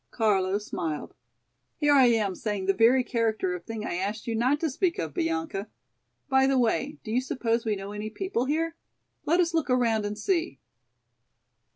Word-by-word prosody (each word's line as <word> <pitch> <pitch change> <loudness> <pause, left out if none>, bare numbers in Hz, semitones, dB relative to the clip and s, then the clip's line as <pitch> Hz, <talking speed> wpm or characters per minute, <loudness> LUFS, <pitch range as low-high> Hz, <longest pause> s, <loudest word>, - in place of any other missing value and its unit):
Carlo 200 -4 +1
smiled. 165 -7 -4 0.6
"Here 295 -1 +3
I 265 -3 +7
am 220 -5 +2
saying 205 0 -3
the 195 - +3
very 235 +5 +4
character 225 -6 0
of 180 -1 -7
thing 225 -1 -5
I 175 - -2
asked 205 +4 -3
you 230 - -2
not 255 +6 +2
to 325 - +1
speak 340 +5 0
of, 155 -3 -3
Bianca! 165 +6 -2 0.6
By 265 -1 +4
the 270 -1 +2
way, 225 -11 +1
do 215 - -6
you 245 +3 +2
suppose 235 -3 -1
we 215 -2 +1
know 195 +1 -7
any 210 +1 -5
people 260 - -2
here? 325 +4 -1 0.5
Let 340 +4 +3
us 340 -1 +2
look 325 -4 0
around 230 -4 +2
and 205 0 -5
see." 340 - -1
225 Hz, 185 wpm, -27 LUFS, 205-265 Hz, 0.6 s, I